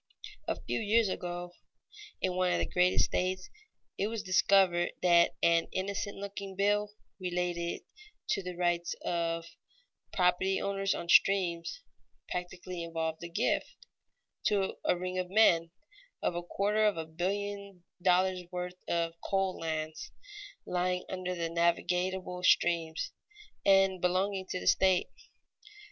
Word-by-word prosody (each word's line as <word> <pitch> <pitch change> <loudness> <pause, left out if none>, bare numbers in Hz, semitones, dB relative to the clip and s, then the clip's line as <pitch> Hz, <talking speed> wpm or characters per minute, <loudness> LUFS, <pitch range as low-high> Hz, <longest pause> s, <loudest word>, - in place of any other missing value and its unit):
A - - -1
few - - -2
years 220 0 +3
ago, 175 -1 -4 0.7
in 185 -1 +1
one 185 -1 +2
of - - +2
the - - 0
greatest 180 0 +3
states, 185 +1 -2 0.5
it 200 - +1
was 225 -1 -4
discovered 185 -2 +3
that 170 -1 +5
an 170 0 +4
innocent 200 +1 -3
looking 200 -1 -6
bill, 205 +1 +2 0.3
relating 175 -1 -2 0.5
to - - +1
the 180 -1 -6
rights 175 -1 0
of 165 -1 -1 0.7
property 185 +1 +2
owners 195 0 0
on 170 - -5
streams, 180 - +3 0.5
practically 180 0 -5
involved 160 -1 -3
the 170 - -6
gift, 170 - 0 0.7
to 195 -2 +1
a - - +2
ring 185 +1 -3
of 180 -1 -3
men, 175 -5 +4 0.5
of - - +1
a 175 - -3
quarter 205 +4 0
of 210 -4 +3
a 160 - -3
billion 200 +3 -4 0.2
dollars' 185 0 +2
worth 180 0 -5
of 170 -1 0
coal 195 -1 0
lands, 155 -1 -4 0.5
lying 180 0 -1
under 185 -1 -3
the 170 -1 -2
navigable 180 +2 0
streams, 170 -3 +2 0.5
and 195 -2 +4
belonging 190 +1 0
to 185 - -3
the - - -8
state. 190 -1 +3
180 Hz, 130 wpm, -31 LUFS, 175-195 Hz, 0.7 s, that